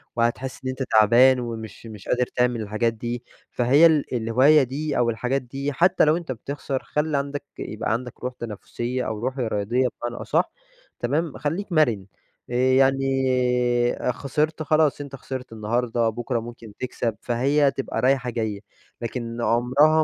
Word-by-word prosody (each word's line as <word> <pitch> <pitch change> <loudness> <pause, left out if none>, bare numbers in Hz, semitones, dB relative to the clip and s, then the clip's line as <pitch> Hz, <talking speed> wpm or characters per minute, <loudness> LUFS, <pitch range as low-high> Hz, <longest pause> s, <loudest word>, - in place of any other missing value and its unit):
وهتحس 120 +3 -1
إن 130 - -2
أنت 130 +1 -3
تعبان 120 +4 +6
ومش 115 -2 -6
مش 105 -3 -11
قادر 125 0 +2
تعمل 125 -2 +1
الحاجات 110 +2 0
دي، 120 +2 -5 0.3
فهي 130 +6 +5
ال 155 -5 +3
الهواية 130 +6 +4
دي 145 +4 -3
أو 120 -1 +3
الحاجات 125 +4 -1
دي 135 +3 -4
حتّى 175 +6 +4
لو 155 +2 +3
أنت 170 -6 -5
بتخسر، 135 +2 -4
خلِّ 150 0 -1
عندك 140 +1 -2 0.2
يبقى 105 0 -2
عندك 125 +1 -5
روح 125 0 -4
تنافسية 120 +3 -4
أو 110 -1 -3
روح 130 +4 -3
رياضية 120 +2 0 0.2
بمعنى 120 0 -4
أصح. - - +1 0.5
تمام؟ 145 +5 -1
خلّيك 175 +7 -3
مرن، 120 - +2 0.4
آآ، - - -6
يعني 135 +2 +3 1.1
خسرت 155 +5 -1
خلاص 155 -1 +2
أنت 140 -1 -7
خسرت 130 -2 -7
النهارده، 115 +1 0
بُكرة 120 +2 -2
ممكن 115 -2 -10
تكسب، 120 -3 -2
فهي 140 +4 +2
تبقى 135 -4 -3
رايحة 130 0 +2
جايّة. 110 -4 -3 0.4
لكن 115 0 -4
عمرها 135 +7 +4
125 Hz, 155 wpm, -24 LUFS, 115-140 Hz, 1.1 s, تعبان